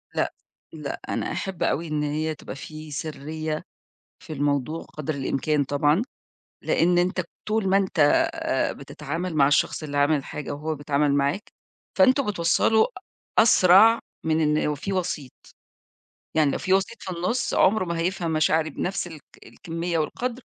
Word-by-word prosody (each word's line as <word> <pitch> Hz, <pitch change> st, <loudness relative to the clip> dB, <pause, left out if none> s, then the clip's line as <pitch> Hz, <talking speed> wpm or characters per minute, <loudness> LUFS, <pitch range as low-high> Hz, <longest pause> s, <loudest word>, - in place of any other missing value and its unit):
لأ، -, -, 0 dB, 0.4 s
لأ، -, -, -5 dB
أنا -, -, -2 dB
أحب 190 Hz, -4 st, -3 dB
أوي 165 Hz, +3 st, 0 dB
إن 150 Hz, -1 st, -1 dB
هي 155 Hz, +2 st, -1 dB
تبقى -, -, -9 dB
في 155 Hz, +2 st, -9 dB
سرّية 155 Hz, +1 st, -4 dB, 0.6 s
في -, -, -9 dB
الموضوع 145 Hz, +2 st, -1 dB
قدر 155 Hz, 0 st, -5 dB
الإمكان 140 Hz, +2 st, 0 dB
طبعًا، 145 Hz, +6 st, +2 dB, 0.6 s
لإن 175 Hz, +1 st, +2 dB
أنت 180 Hz, +1 st, +1 dB, 0.3 s
طول 215 Hz, -2 st, +1 dB
ما 190 Hz, +1 st, +4 dB
أنت 190 Hz, -4 st, -1 dB, 0.3 s
آآ، -, -, -1 dB
بتتعامل 165 Hz, +4 st, -5 dB
مع 140 Hz, -2 st, +5 dB
الشخص 145 Hz, +2 st, +1 dB
اللي 145 Hz, -1 st, -4 dB
عامل 145 Hz, +2 st, +4 dB
الحاجة 145 Hz, +1 st, -6 dB
وهو 155 Hz, +2 st, -3 dB
بيتعامل 145 Hz, 0 st, +1 dB
معاك، 140 Hz, +8 st, 0 dB, 0.5 s
فأنتم 275 Hz, 0 st, +5 dB
بتوصّلوا 200 Hz, +3 st, +3 dB, 0.5 s
أسرع 220 Hz, +1 st, +7 dB, 0.3 s
من 160 Hz, 0 st, +2 dB, 0.2 s
إن -, -, +1 dB
وفيه 150 Hz, +6 st, -3 dB
وسيط، 160 Hz, -8 st, -2 dB, 1.0 s
يعني 155 Hz, -3 st, +4 dB
لو -, -, -1 dB
في 185 Hz, -, 0 dB
وسيط 195 Hz, +5 st, +1 dB
في 185 Hz, -, -5 dB
النُص 185 Hz, +9 st, -1 dB
عمره 200 Hz, 0 st, +3 dB
ما 170 Hz, -1 st, -3 dB
هيفهم 175 Hz, -1 st, -1 dB
مشاعري 155 Hz, 0 st, +2 dB
بنَفْس 185 Hz, +5 st, -3 dB
الك 160 Hz, -4 st, -11 dB, 0.2 s
الكميّة 170 Hz, +1 st, -4 dB
والقدر، 245 Hz, +10 st, -3 dB
160 Hz, 150 wpm, -25 LUFS, 150-185 Hz, 1.0 s, أسرع